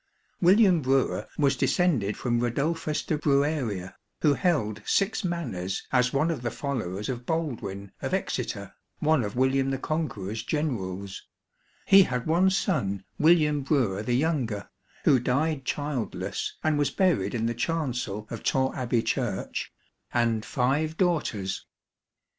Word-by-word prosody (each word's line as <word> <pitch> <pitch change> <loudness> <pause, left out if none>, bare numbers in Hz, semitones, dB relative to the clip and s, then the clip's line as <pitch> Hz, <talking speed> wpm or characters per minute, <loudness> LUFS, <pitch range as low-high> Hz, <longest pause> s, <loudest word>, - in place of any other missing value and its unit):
William 185 -1 +5
Brewer 135 0 +1
was 140 -2 +3
descended 130 - +1
from 120 -2 0
Radulphus 150 +6 -1
de 155 - -1
Brueria, 140 - 0 0.3
who 150 -2 +5
held 120 - 0
six 200 - +1
Manors 120 - -3
as 125 -1 +3
one 150 +5 +1
of 150 -7 -3
the 120 - -1
followers 110 -7 -3
of 125 -2 -5
Baldwin, 115 - -3
of - - -3
Exeter, - - -2 0.2
one 155 -4 +2
of 105 +1 -4
William 130 +1 +2
the 135 - -1
Conqueror's 115 - -3
generals; 100 - -3 0.6
he 195 0 +8
had 125 -9 0
one 175 +4 +4
son, 155 - 0 0.2
William 155 -2 +4
Brewer 130 -9 +1
the 120 +3 0
younger 130 -9 -1 0.3
(who 130 - +5
died 135 +3 0
childless, 145 -5 -3
and 155 -2 +2
was 145 -2 +2
buried 140 - +1
in 115 -1 0
the 115 - 0
chancel 125 -7 -2
of 115 - -5
Torre 130 0 +1
Abbey 120 -3 0
Church), 115 -4 -2 0.4
and 115 -2 +1
five 145 +7 0
daughters. 120 - -1
135 Hz, 135 wpm, -27 LUFS, 110-155 Hz, 0.6 s, he